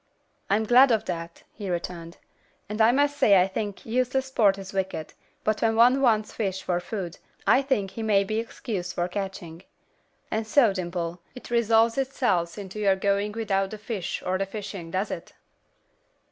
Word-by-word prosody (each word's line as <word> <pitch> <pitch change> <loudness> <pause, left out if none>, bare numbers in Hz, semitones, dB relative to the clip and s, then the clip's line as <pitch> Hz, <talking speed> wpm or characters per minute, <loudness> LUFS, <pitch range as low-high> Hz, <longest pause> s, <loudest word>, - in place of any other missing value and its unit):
"I'm 205 +3 +2
glad 250 +4 +6
of 220 -2 +1
that," 170 -1 -6
he 200 -3 -6
returned, 170 -1 -5 0.5
"and 210 +2 -2
I 220 +2 +6
must 285 +2 +2
say 200 -7 +6
I 180 - +5
think 205 0 -5
useless 255 +3 0
sport 215 -7 +3
is 195 -1 -9
wicked, 190 -5 -3 0.3
but 215 0 0
when 225 -1 +2
one 245 +4 +5
wants 220 -5 +2
fish 190 -4 -2
for 175 -1 0
food, 180 -1 -6 0.3
I 260 - +5
think 235 -9 -1
he 225 - -6
may 210 -3 +3
be 215 +3 -2
excused 200 -5 -5
the 175 0 0
catching. 180 -3 -6 0.7
And 220 0 -1
so, 225 -2 +4
Dimple, 175 -2 -4
it 250 - -11
resolves 230 +1 +3
itself 230 -11 0
into 200 0 -7
your 200 -2 +3
going 200 +2 0
without 195 -3 0
the 215 - -7
fish 205 -4 -4
or 185 +1 0
the 195 - -1
fishing, 195 -4 -7
does 190 +5 -2
it?" - - -7
205 Hz, 175 wpm, -26 LUFS, 185-225 Hz, 0.7 s, glad